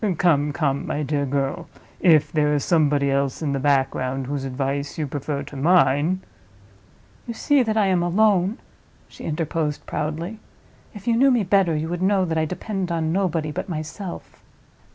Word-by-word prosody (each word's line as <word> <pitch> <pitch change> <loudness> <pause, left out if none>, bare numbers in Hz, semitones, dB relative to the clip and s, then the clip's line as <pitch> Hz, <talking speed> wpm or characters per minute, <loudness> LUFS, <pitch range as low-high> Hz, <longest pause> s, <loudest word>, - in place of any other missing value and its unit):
Come, 150 -4 +2
come, 140 -2 -1
my 150 - -2
dear 140 0 -1
girl! 135 0 -2 0.3
if 160 -5 +4
there 150 -1 +2
is 145 - 0
somebody 145 -4 +2
else 140 +2 -1
in 145 -2 0
the 135 - -1
background, 135 -1 0
whose 140 0 -3
advice 140 +2 -3
you 155 - -1
prefer 140 0 -4
to 140 - -11
mine—" 165 +3 +3 1.1
"You 235 - -5
see 285 +3 +3
that 220 -2 0
I 210 - +4
am 185 -2 +2
alone," 195 +2 +2 0.5
she - - -11
interposed, 155 -1 -2
proudly. 165 +8 -4 0.6
"If 210 +3 -11
you 230 - +3
knew 270 +4 +5
me 245 -5 +3
better, 185 -3 +2
you 155 +1 -2
would 175 0 -3
know 190 0 +2
that 160 -2 -1
I 160 - +1
depend 185 +2 -4
on 165 -1 0
nobody 170 -5 0
but 170 - -5
myself." 170 +3 -7
155 Hz, 175 wpm, -23 LUFS, 140-185 Hz, 1.1 s, knew